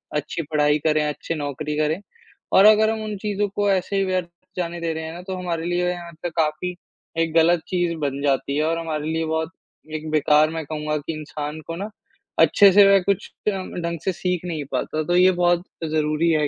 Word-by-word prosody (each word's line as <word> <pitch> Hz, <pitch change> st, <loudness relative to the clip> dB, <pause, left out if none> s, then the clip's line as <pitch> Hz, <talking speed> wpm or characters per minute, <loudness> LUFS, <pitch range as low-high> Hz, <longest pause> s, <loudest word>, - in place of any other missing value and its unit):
अच्छी 150 Hz, +3 st, -2 dB
पढ़ाई 150 Hz, 0 st, +3 dB
करें, 155 Hz, 0 st, +2 dB
अच्छी 150 Hz, +2 st, -4 dB
नौकरी 150 Hz, 0 st, -4 dB
करें। 155 Hz, +4 st, 0 dB, 0.5 s
और 195 Hz, -, +7 dB
अगर 215 Hz, 0 st, +6 dB
हम 220 Hz, -1 st, -3 dB
उन 215 Hz, -1 st, -4 dB
चीज़ों 205 Hz, 0 st, -1 dB
को 205 Hz, 0 st, +1 dB
ऐसे 190 Hz, +1 st, 0 dB
ही 195 Hz, -, +2 dB
व्यर्थ 185 Hz, -2 st, -1 dB, 0.3 s
जाने 175 Hz, -1 st, -3 dB
दे 165 Hz, -1 st, -1 dB
रहे 160 Hz, 0 st, -5 dB
हैं 160 Hz, -, -6 dB
ना 175 Hz, -, -8 dB
तो 190 Hz, -, -3 dB
हमारे 170 Hz, -2 st, -3 dB
लिए 175 Hz, 0 st, 0 dB
यहाँ 175 Hz, -1 st, -7 dB
त -, -, 0 dB
काफ़ी 160 Hz, +3 st, 0 dB, 0.4 s
एक 165 Hz, -1 st, 0 dB
गलत 165 Hz, +1 st, +4 dB
चीज़ 175 Hz, -2 st, 0 dB
बन 140 Hz, -2 st, -2 dB
जाती 140 Hz, 0 st, +1 dB
है 150 Hz, -, +2 dB
और 165 Hz, +1 st, 0 dB
हमारे 155 Hz, -2 st, -3 dB
लिए 160 Hz, 0 st, -1 dB
बहुत 160 Hz, 0 st, -1 dB, 0.5 s
एक 155 Hz, 0 st, -5 dB
बेकार 150 Hz, 0 st, +4 dB
मैं 160 Hz, -1 st, -4 dB
कहूँगा 150 Hz, 0 st, -2 dB
कि 150 Hz, +2 st, -5 dB
इंसान 150 Hz, 0 st, -5 dB
को 165 Hz, -, -4 dB
ना, 200 Hz, +5 st, -5 dB, 0.5 s
अच्छे-से 200 Hz, 0 st, +7 dB
वह 195 Hz, 0 st, +6 dB
कुछ 200 Hz, 0 st, -1 dB, 0.2 s
अ, -, -, +1 dB
ढंग 175 Hz, -3 st, -4 dB
से 190 Hz, -, +2 dB
सीख 180 Hz, 0 st, -2 dB
नहीं 160 Hz, -4 st, -3 dB
पाता, 155 Hz, +4 st, -1 dB
तो 175 Hz, +3 st, 0 dB
ये 185 Hz, +1 st, +6 dB
बहुत 175 Hz, -1 st, +2 dB, 0.3 s
ज़रूरी 155 Hz, +1 st, +1 dB
है 155 Hz, -2 st, +2 dB
165 Hz, 210 wpm, -23 LUFS, 155-180 Hz, 0.5 s, और